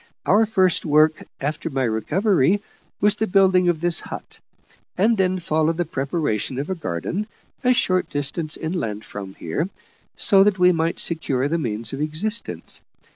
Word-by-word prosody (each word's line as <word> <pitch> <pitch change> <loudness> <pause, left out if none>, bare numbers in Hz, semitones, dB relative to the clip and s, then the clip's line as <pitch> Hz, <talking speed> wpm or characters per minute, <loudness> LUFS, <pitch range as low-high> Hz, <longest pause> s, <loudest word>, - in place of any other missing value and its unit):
Our 215 +3 +4
first 190 -4 +2
work, 155 +1 +3 0.2
after 150 +3 -3
my 135 -3 -1
recovery, 170 - +2 0.4
was 210 0 +5
the 220 +1 -1
building 185 -2 +4
of 160 -3 0
this 175 -1 +2
hut: - - -9 0.6
and 220 +5 +3
then 185 -2 +1
followed 160 -1 0
the 175 - 0
preparation 135 -5 -2
of 145 +7 -3
a - - +2
garden, 175 - -3 0.4
a 250 - +4
short 185 -7 +1
distance 150 +2 -3
inland 115 - -3
from 100 -2 -8
here, 150 - -3 0.5
so 195 -1 +5
that 205 -1 +2
we 180 0 +5
might 165 -1 -1
secure 140 -5 +1
the 165 +3 0
means 115 -4 -3
of 135 - -4
existence. 185 +10 -2
165 Hz, 160 wpm, -22 LUFS, 140-190 Hz, 0.6 s, was